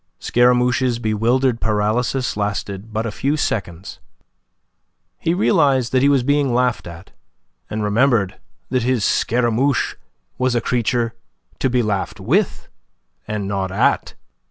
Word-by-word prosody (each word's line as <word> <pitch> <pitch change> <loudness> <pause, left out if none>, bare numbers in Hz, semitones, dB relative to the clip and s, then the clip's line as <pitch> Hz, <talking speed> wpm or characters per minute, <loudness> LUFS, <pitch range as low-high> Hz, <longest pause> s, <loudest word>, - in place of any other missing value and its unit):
Scaramouche's 125 0 +2
bewildered 115 +3 +1
paralysis 110 +5 0
lasted 100 0 -3
but 110 +1 -2
a 115 - -2
few 140 +8 -1
seconds. 95 - -3 1.2
He 165 - 0
realized 140 - +2
that 130 - +3
he 140 - +4
was 135 -3 +3
being 140 -2 +1
laughed 125 -5 0
at, 85 +2 -11 0.6
and 105 0 -3
remembered 105 -1 +1 0.3
that 130 -1 +1
his 125 -3 +1
Scaramouche 125 +3 +1 0.5
was 130 -1 +1
a - - +3
creature 120 0 0 0.5
to 130 - +1
be 125 -1 +1
laughed 100 -3 -2
with, - - 0 0.6
and 105 -2 -3
not 95 -1 -2
at. 95 - +1
120 Hz, 130 wpm, -20 LUFS, 105-130 Hz, 1.2 s, he